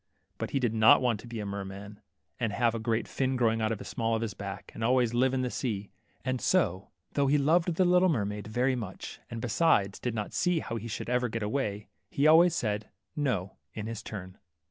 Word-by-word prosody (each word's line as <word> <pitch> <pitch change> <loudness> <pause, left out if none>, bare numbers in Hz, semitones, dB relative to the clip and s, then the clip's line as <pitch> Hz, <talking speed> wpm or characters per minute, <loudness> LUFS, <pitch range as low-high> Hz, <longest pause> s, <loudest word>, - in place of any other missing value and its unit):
'' - - -46
But - - -3
he 135 - 0
did 120 -4 0
not 110 0 +7
want 120 -5 +1
to 120 - -11
be 115 -1 -6
a 105 - -4
merman, 100 +1 -6 0.4
and 115 -3 0
have 115 +2 +2
a 115 - -3
great 115 +1 -1
fin 130 -1 -1
growing 115 -2 +2
out 110 0 +1
of 110 - -1
the - - -9
small 115 0 -1
of 110 - -1
his 110 -3 -3
back, 100 -1 -7
and 110 - -5
always 120 -1 +3
live 130 +2 +3
in 130 -1 0
the 125 - -2
sea 105 -6 -3 0.2
\ - - -37
and 130 -1 -1
so, 100 - +1 0.2
though 140 -1 +2
he 145 +2 +4
loved 165 +4 +2
the 185 - +3
little 180 +1 +5
mermaid 105 - -2
very 125 +4 +1
much, 105 -6 -7
and, 115 - -5
besides, 115 -5 +2
did 125 -2 -3
not 105 -2 -4
see 180 -1 +1
how 115 -7 -3
he 115 +1 -6
should 110 - -5
ever 125 0 +1
get 115 0 -3
away, 105 -3 -2 0.2
he 140 - 0
always 165 +2 +7
said, 105 -4 -2 0.3
^^No," 110 -11 -1 0.2
in 105 - -4
his 115 -1 -5
turn. 95 -3 -8
115 Hz, 235 wpm, -29 LUFS, 105-130 Hz, 0.4 s, not